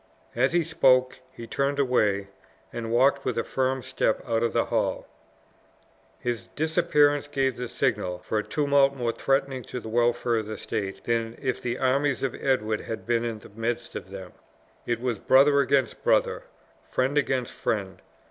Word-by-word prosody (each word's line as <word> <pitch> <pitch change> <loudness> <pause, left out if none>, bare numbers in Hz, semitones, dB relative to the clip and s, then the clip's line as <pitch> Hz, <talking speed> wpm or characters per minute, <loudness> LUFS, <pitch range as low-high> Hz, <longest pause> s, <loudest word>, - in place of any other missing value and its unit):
As 130 +3 +2
he 175 0 +2
spoke 130 -5 +3
he 115 -2 -9
turned 140 +4 -1
away, 105 -7 +1 0.4
and 115 -1 -4
walked 135 +3 +3
with 125 - -2
a 115 - +1
firm 130 -1 -1
step 110 - 0
out 115 -1 +1
of 115 -1 +1
the - - +1
hall. - - -1 1.1
His 120 -2 -3
disappearance 150 -2 +2
gave 135 -3 0
the 125 - -4
signal 90 -5 -1
for 105 +4 -2
a - - -2
tumult 140 -2 +2
more 120 -3 -1
threatening 135 +1 0
to 125 - -5
the 110 - -8
welfare 120 0 +1
of 110 -1 -3
the 110 -1 -5
state, 95 0 -4
than 115 -1 -1
if 130 -2 -2
the 120 0 -2
armies 135 +1 +1
of 135 - 0
Edward 110 -5 0
had 115 - -6
been 120 0 +1
in 115 -2 -3
the 105 - -14
midst 115 +3 -4
of 95 - -6
them. 95 -2 -9 0.6
It 120 -1 0
was 120 -4 -2
brother 140 +2 +5
against 140 -1 +1
brother, - - +2 0.4
friend 130 +3 -1
against 130 -4 0
friend. 100 -4 -3
125 Hz, 175 wpm, -26 LUFS, 115-135 Hz, 1.1 s, brother